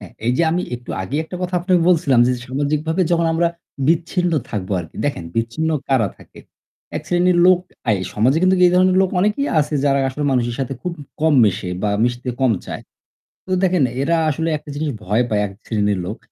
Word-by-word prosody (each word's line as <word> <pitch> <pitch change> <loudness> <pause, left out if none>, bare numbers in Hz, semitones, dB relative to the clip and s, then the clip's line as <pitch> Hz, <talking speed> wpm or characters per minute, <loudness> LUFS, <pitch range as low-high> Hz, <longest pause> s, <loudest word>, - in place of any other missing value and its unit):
হ্যাঁ, 95 -5 -12
এই 120 - +3
যে - - +4
আমি 175 +2 0
একটু 120 0 -9
আগেই 140 +11 -2
একটা 180 - -7
কথা 180 0 -3
আপনাকে 180 0 +2
বলছিলাম 155 -8 +4
যে 125 - +2
সামাজিকভাবে 150 +6 -1
যখন 170 -1 +2
আমরা 170 +1 +2 0.4
বিচ্ছিন্ন 175 +1 +1 0.2
থাকবো 100 -2 -3
আরকি। 80 -1 -11
দেখেন 140 -12 -2
বিচ্ছিন্ন 120 +8 -1 0.2
কারা 130 -7 +2
থাকে। - - -17 0.6
এক - - -4
শ্রেণীর 175 0 +3
লোক 185 -1 +6 0.3
আই 105 - +4 0.2
সমাজে 125 +8 +3
কিন্তু 185 0 +4
এই - - +4
ধরনের 185 0 +4
লোক 190 - 0
অনেকেই 210 +9 +1
আছে 150 +1 -2
যারা 140 -1 +3
আসলে 145 +3 -4
মানুষের 120 -2 0
সাথে 135 0 -2
খুব 180 - -3 0.3
কম 160 -1 +3
মেশে 95 -3 -1
বা 105 - +1
মিশতে 120 +1 -2
কম 130 -3 +3
চায়। - - -6 0.6
তো 185 - -8
দেখেন 180 -5 +3 0.2
এরা 165 +4 +2
আসলে 160 +3 -1
একটা 150 - -14
জিনিস 150 +1 -2
ভয় 105 +6 +1
পায় 105 -1 +1
এক 100 - -6
শ্রেণীর 105 -3 0
লোক। - - -5
145 Hz, 200 wpm, -20 LUFS, 120-175 Hz, 0.6 s, লোক